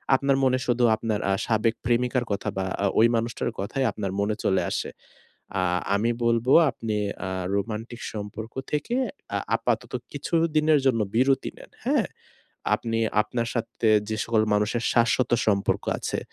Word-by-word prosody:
আপনার 135 0 +2
মনে 130 -1 +3
শুধু 120 0 +1
আপনার 110 -1 -2
আ - - +3
সাবেক 110 0 +2
প্রেমিকার 125 +1 +1
কথা 100 +1 -1
বা 95 - 0 0.2
আ - - +3
ওই 115 - +7
মানুষটার 115 +1 -1
কথাই 115 +8 -1
আপনার 100 -3 -4
মনে 105 +1 +1
চলে 95 - +2
আসে। - - -2 0.7
আ - - 0 0.3
আমি 110 +4 +2
বলব 115 0 +2 0.2
আপনি 110 -3 -3 0.3
আ - - -3 0.3
রোমান্টিক 110 +3 -4
সম্পর্ক 110 +1 -6 0.2
থেকে 150 - -1 0.4
আ - - +1 0.2
আপাতত - - -2 0.2
কিছুদিনের 155 -2 +2
জন্য 115 -4 +3
বিরতি 130 +3 +2
নেন; - - -14
হ্যাঁ? - - +2 0.7
আপনি 115 -1 -2 0.2
আপনার 115 +2 -3
সাথে 115 -1 -1 0.2
যে 110 - -1
সকল 110 -2 +2
মানুষের 105 +3 0
শাশ্বত 120 +1 +2 0.2
সম্পর্ক 100 -2 +1
আছে, - - -3
115 Hz, 150 wpm, -25 LUFS, 110-125 Hz, 0.7 s, ওই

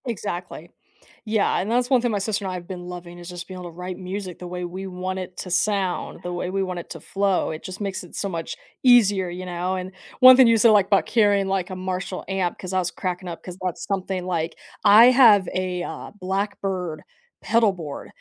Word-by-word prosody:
Exactly. 175 -7 -5 0.6
Yeah, 215 -2 +1
and 195 - -2
that's 245 +1 +1
one 255 -3 +4
thing 240 -1 0
my 210 - 0
sister 205 0 -2
and 190 - -2
I - - -4
have 175 -1 -7
been 180 -2 -7
loving 175 -1 -8
is 175 0 -9
just 175 0 -7
being 185 -1 -8
able 180 -1 -7
to - - -19
write 180 0 -5
music 185 -1 -6
the 180 - -7
way 180 0 -4
we 185 +2 -6
want 185 0 -4
it 185 -1 -8
to 180 - -6
sound, 190 0 0
the 180 - -4
way 175 +1 -3
we 195 +1 -1
want 180 -2 -4
it - - -10
to - - -7
flow, 195 -1 0
it 155 - -7
just 185 +2 -7
makes 195 -2 -3
it 175 - -12
so 200 - -2
much 165 -3 -4 0.3
easier, 205 -7 +5
you 180 +1 -6
know? 180 +1 -2
And 185 0 -5 0.3
one 255 0 +10
thing 260 -2 +8
you 230 0 +5
said, 225 +1 +6
like, 205 -3 +4
about 200 -2 +3
carrying, 205 -4 +3
like, 190 -1 -1
a 185 - -5
Marshall 185 0 -4
amp 190 -3 -1
‘cause 185 0 -6
I 185 - +2
was 180 -1 -1
cracking 180 -1 -4
up 170 - -8
‘cause 180 -1 -8
that's 180 -2 -3
something, 190 -2 -2
like 170 -2 -2 0.3
I 215 +3 +9
have 230 -7 +6
a, 180 -1 -2
uh, - - -7
Blackbird 190 -3 -3 0.4
pedalboard, 190 -10 0
185 Hz, 230 wpm, -23 LUFS, 180-200 Hz, 0.6 s, one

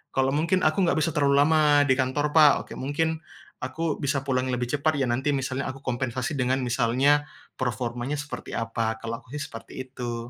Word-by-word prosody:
kalau 135 0 +2
mungkin, 170 +4 +1
"Aku 155 +5 +2
nggak 170 - +1
bisa 160 +1 +1
terlalu 140 -1 +3
lama 155 +2 +4 0.3
di 130 - +5
kantor, 145 +3 0
Pak," 155 -3 +7
oke. - - -9
"mungkin 160 +4 -1 0.4
aku 145 +5 -2
bisa 140 -1 0
pulang 130 -1 0
lebih 125 0 -1
cepat 145 +3 +1
ya. 135 - +2
Nanti 135 +5 0
misalnya 135 0 -2
aku 135 - -12
kompensasi 130 +2 -2
dengan 130 +1 +1
misalnya 130 +5 +2 0.3
performanya 120 +2 -2
seperti 145 +1 -7
apa." 115 0 -2
Kalau 115 0 -5
aku 120 - -21
sih - - -3
seperti 115 - -10 0.2
itu. 120 -2 -4
135 Hz, 185 wpm, -26 LUFS, 125-145 Hz, 0.4 s, Pak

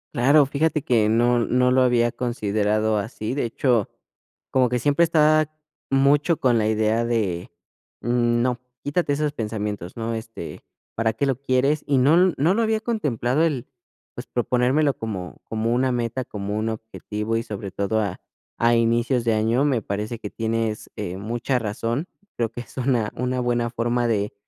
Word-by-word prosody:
Claro, 140 +4 +5
fíjate 150 +2 0
que 115 -6 +2
no 120 +2 +3
no 125 +2 +2
lo 130 0 +4
había 120 -2 +3
considerado 110 -2 0
así, 110 +2 -4
de 140 -2 -1
hecho, 115 -2 +1 0.6
como 130 -1 +3
que 125 - 0
siempre 145 +5 +3
estaba 155 -1 +4 0.5
mucho 145 +4 +3
con 125 -3 +3
la 110 -1 +1
idea 110 +1 +1
de: 100 -7 -1 0.5
"No, 120 +1 +1 0.2
quítate 145 +1 0
esos 150 0 0
pensamientos", 105 - -4
¿no? 115 0 -2
Este, 115 0 -8 0.3
¿para 110 0 +1
qué 140 - -1
lo 135 -3 0
quieres? 140 +3 +1
Y 140 -2 +2
no 165 +7 +5
no 160 +7 +3
lo 230 - +2
había 220 -1 +1
contemplado 150 - 0
el, 145 -7 -1 0.5
pues, - - -7
proponérmelo 125 +4 +1
como 95 -6 -5
como 110 +1 -1
una 130 0 +1
meta, 120 +1 -2
como 105 -1 -4
un 110 +1 -1
objetivo, 110 0 -4
y 115 - -2
sobre 100 -4 -6
todo 100 +3 0
a 105 - -3 0.4
a 120 0 +3
inicios 115 +2 +2
de 115 - +3
año, 115 +5 +2
me 130 -6 +1
parece 105 +4 -4
que 105 - -6
tienes, 115 -1 -2
eh, 95 -4 -4
mucha 120 +5 -1
razón. 115 - -2 0.3
Creo 115 -2 0
que 120 - -8
es - - -14
una 125 -4 +1
una 125 +1 -1
buena 120 -1 0
forma 120 +1 0
de, 105 -3 0
120 Hz, 170 wpm, -23 LUFS, 110-130 Hz, 0.6 s, Claro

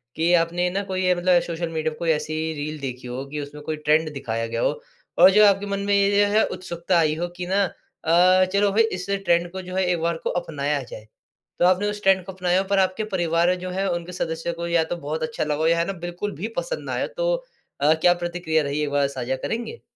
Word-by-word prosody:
कि 165 +2 +2
आपने 175 +1 +2
ना 195 +3 -2
कोई 185 -1 -2
अ, 180 - +4
मतलब 175 0 +4
सोशल 170 0 -4
मीडिया 160 -1 -2
पे - - -14
कोई 170 - -1
ऐसी 155 0 -2 0.2
रील 155 0 -5
देखी 125 -2 -6
हो 125 +2 -5
कि 150 - -4
उसमें 145 +1 -9
कोई 155 +1 -3
ट्रेंड 155 +1 +2
दिखाया 115 -4 -3
गया 115 0 -3
हो। - - +2 0.5
और 185 +2 +9
जो 210 +2 +6
है - - +8
आपके 195 +1 0
मन 200 0 -2
में 200 - +1
ये 200 +1 +4
जो 205 - -1
है 220 - +5
उत्सुकता 175 -1 -2
आई 155 -1 +2
हो 175 +2 -2
कि 180 - -4
ना 195 +2 +2
अ, 180 +1 +2
चलो 200 0 +3
भाई 220 +3 +4
इस 180 -5 -3 0.2
ट्रेंड 170 0 +2
को 190 +1 -6
जो 185 0 -8
है 190 - +2
एक 180 -2 +1
बार 170 0 0
को - - 0
अपनाया 150 -4 -2
जाए। 110 -3 -11 0.5
तो - - +4
आपने 185 +3 +3
उस 210 0 -5
ट्रेंड 190 -1 +4
को 190 - -6
अपनाया 180 0 +1
हो - - -5
पर 200 -1 +3
आपके 190 +3 +1
परिवार 170 -1 +2
में 180 0 +1
जो 185 +1 -5
है, 195 +2 -1
उन 170 -1 -3
सदस्यों 165 -1 -3
को 170 0 -5
या 170 -1 +2
तो 160 +2 -4
बहुत 155 0 -4
अच्छा 155 0 -2
लगा 150 -1 -1
हो 160 - +2
या 170 0 +3
है 170 - +1
ना 195 - -2
बिल्कुल 175 +4 -4
भी 185 +9 -4
पसंद - - -3
ना - - -4
आए। - - -1
तो - - +1 0.5
अ, 150 +2 +5
क्या 170 +2 +4
प्रतिक्रिया 175 -2 -1
रही 145 +1 -2
एक 150 - -1
बार 140 -1 +2
साझा 130 -1 -3
करेंगे? 235 - -5
175 Hz, 260 wpm, -23 LUFS, 155-185 Hz, 0.5 s, और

